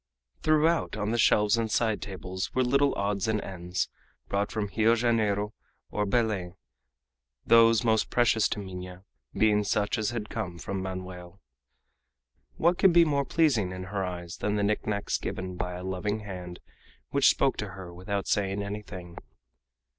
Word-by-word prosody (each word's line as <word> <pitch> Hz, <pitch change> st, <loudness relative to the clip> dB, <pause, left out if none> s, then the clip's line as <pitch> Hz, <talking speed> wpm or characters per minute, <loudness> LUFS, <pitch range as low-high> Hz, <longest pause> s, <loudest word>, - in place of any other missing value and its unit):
Throughout 155 Hz, -4 st, +2 dB
on 105 Hz, 0 st, -1 dB
the 120 Hz, -, 0 dB
shelves 105 Hz, 0 st, +4 dB
and 115 Hz, -1 st, -1 dB
side 110 Hz, -1 st, +1 dB
tables 95 Hz, -1 st, -5 dB
were 130 Hz, -, +3 dB
little 140 Hz, +3 st, +2 dB
odds 100 Hz, 0 st, -1 dB
and 110 Hz, -1 st, +1 dB
ends, 90 Hz, -1 st, -3 dB, 0.4 s
brought 100 Hz, +1 st, 0 dB
from 105 Hz, -2 st, -2 dB
Rio 115 Hz, +1 st, +4 dB
Janeiro 110 Hz, -3 st, +1 dB, 0.4 s
or 105 Hz, -1 st, -1 dB
Belem, 100 Hz, -5 st, 0 dB, 0.9 s
those 115 Hz, -1 st, +6 dB
most 110 Hz, -2 st, +2 dB
precious 115 Hz, -3 st, +3 dB
to 105 Hz, -, -2 dB
Minha 90 Hz, -1 st, -8 dB, 0.3 s
being 105 Hz, -1 st, +3 dB
such 105 Hz, +2 st, 0 dB
as 105 Hz, -, 0 dB
had 115 Hz, -3 st, -4 dB
come 95 Hz, -6 st, -4 dB
from 95 Hz, +3 st, -4 dB
Manoel. 95 Hz, -1 st, -7 dB, 1.2 s
What 175 Hz, +2 st, +2 dB
could 190 Hz, -3 st, +6 dB
be 170 Hz, 0 st, +7 dB
more 140 Hz, -3 st, +1 dB
pleasing 130 Hz, -, +2 dB
in 90 Hz, 0 st, -6 dB
her 100 Hz, -1 st, 0 dB
eyes 90 Hz, -2 st, -5 dB
than 105 Hz, 0 st, -1 dB
the 105 Hz, -, 0 dB
knickknacks 105 Hz, 0 st, -1 dB
given 90 Hz, 0 st, -4 dB
by 90 Hz, 0 st, -3 dB
a 90 Hz, +1 st, -6 dB
loving 95 Hz, +3 st, -2 dB
hand 90 Hz, -4 st, -8 dB, 0.5 s
which 140 Hz, -1 st, +5 dB
spoke 135 Hz, -, +2 dB
to 100 Hz, -3 st, -4 dB
her 90 Hz, -2 st, -8 dB
without 95 Hz, +2 st, -3 dB
saying 100 Hz, 0 st, 0 dB
anything? 100 Hz, -4 st, -7 dB
105 Hz, 160 wpm, -28 LUFS, 95-115 Hz, 1.2 s, be